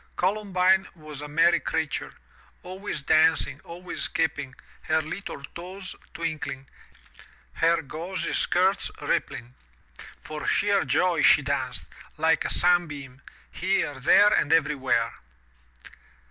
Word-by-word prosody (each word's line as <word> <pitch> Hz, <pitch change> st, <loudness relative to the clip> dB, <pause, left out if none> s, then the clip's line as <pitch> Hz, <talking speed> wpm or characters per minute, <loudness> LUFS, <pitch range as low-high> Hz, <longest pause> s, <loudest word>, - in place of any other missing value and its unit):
Columbine 190 Hz, -1 st, +2 dB
was 155 Hz, -3 st, -9 dB
a 150 Hz, -, -6 dB
merry 165 Hz, +3 st, +3 dB
creature, 160 Hz, -3 st, -3 dB, 0.5 s
always 185 Hz, -5 st, -5 dB
dancing, 160 Hz, +2 st, +3 dB
always 175 Hz, +1 st, -8 dB
skipping, 140 Hz, -5 st, -1 dB, 0.3 s
her 160 Hz, 0 st, +2 dB
little 155 Hz, -1 st, -6 dB
toes 185 Hz, +2 st, -7 dB, 0.2 s
twink 165 Hz, -2 st, -3 dB
ling, 135 Hz, 0 st, -7 dB, 0.9 s
her 165 Hz, 0 st, +2 dB
gauzy 165 Hz, +5 st, -4 dB
skirts 185 Hz, +2 st, +2 dB
rippling! 120 Hz, +1 st, -2 dB, 0.7 s
For -, -, -6 dB
sheer -, -, +2 dB
joy -, -, +2 dB
she -, -, +6 dB
danced, -, -, -2 dB, 0.3 s
like 165 Hz, 0 st, +2 dB
a -, -, -1 dB
sunbeam, 150 Hz, -7 st, 0 dB, 0.3 s
here, 180 Hz, -7 st, -1 dB
there 205 Hz, +10 st, +6 dB
and 150 Hz, -, +1 dB
everywhere. 135 Hz, -7 st, +2 dB
165 Hz, 110 wpm, -26 LUFS, 150-180 Hz, 0.9 s, she